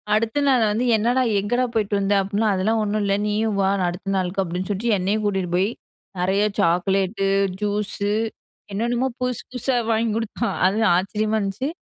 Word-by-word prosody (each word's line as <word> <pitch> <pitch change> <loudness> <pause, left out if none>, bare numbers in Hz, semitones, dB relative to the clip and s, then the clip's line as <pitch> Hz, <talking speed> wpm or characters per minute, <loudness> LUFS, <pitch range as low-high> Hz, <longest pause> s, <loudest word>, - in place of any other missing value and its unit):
அடுத்த 225 +5 0
நாள் 255 -4 +4
வந்து 230 +4 0
என்னடா? 240 +4 +1 0.2
எங்கடா 240 +6 0
போயிட்டு 210 -2 -1
வந்த? 200 +1 +1
அப்டின்னா 200 +3 0
அதெல்லாம் 220 +4 +1
ஒண்ணும் 210 +1 -1
இல்ல, 195 - +1
நீயும் 210 0 0
வா 190 - +2 0.2
அடுத்த 180 +3 -6
நாளுக்கு, 185 +1 0
அப்டின்னு 180 +2 -4
சொல்ட்டு 215 +3 0
என்னையும் 200 +4 0
கூட்டிட்டு 190 -3 -1
போய் 190 +3 +2 0.5
நறைய 190 +3 +2
சாக்லேட்டு, 190 +3 +1 0.3
ஜூஸ்ஸு, 205 0 -1 0.6
என்னென்னமோ 240 +4 0
புதுசு 250 -2 0
புதுசா 255 +1 0 0.2
வாங்கி 225 +1 +1
குடுத்தான். 230 +1 -2
அது 205 +4 0 0.2
ஆச்சரியமா 215 +3 -1
இருந்துச்சு. 200 +7 -2
210 Hz, 155 wpm, -22 LUFS, 195-225 Hz, 0.6 s, நாள்